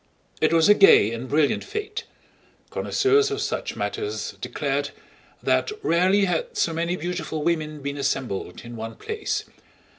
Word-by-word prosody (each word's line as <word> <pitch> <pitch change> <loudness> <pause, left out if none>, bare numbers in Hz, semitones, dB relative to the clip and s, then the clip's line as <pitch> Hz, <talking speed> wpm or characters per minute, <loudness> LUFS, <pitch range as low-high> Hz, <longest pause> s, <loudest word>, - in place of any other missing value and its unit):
It - - +4
was 165 -1 +5
a 210 - +9
gay 195 - +6
and 120 +2 -6
brilliant 145 -1 +2
fete. 430 +2 -5 0.7
Connoisseurs 415 +1 +2
of 415 -1 -2
such - - -2
matters 420 0 -3
declared - - -2 0.5
that - - +2
rarely 185 +4 +3
had 475 - -2
so 165 - +1
many 170 +2 -1
beautiful 175 -2 -3
women 155 -3 -1
been 140 0 -3
assembled 130 -9 -2
in 120 0 -8
one 115 0 -6
place. 435 -1 -3
170 Hz, 145 wpm, -24 LUFS, -, 0.7 s, a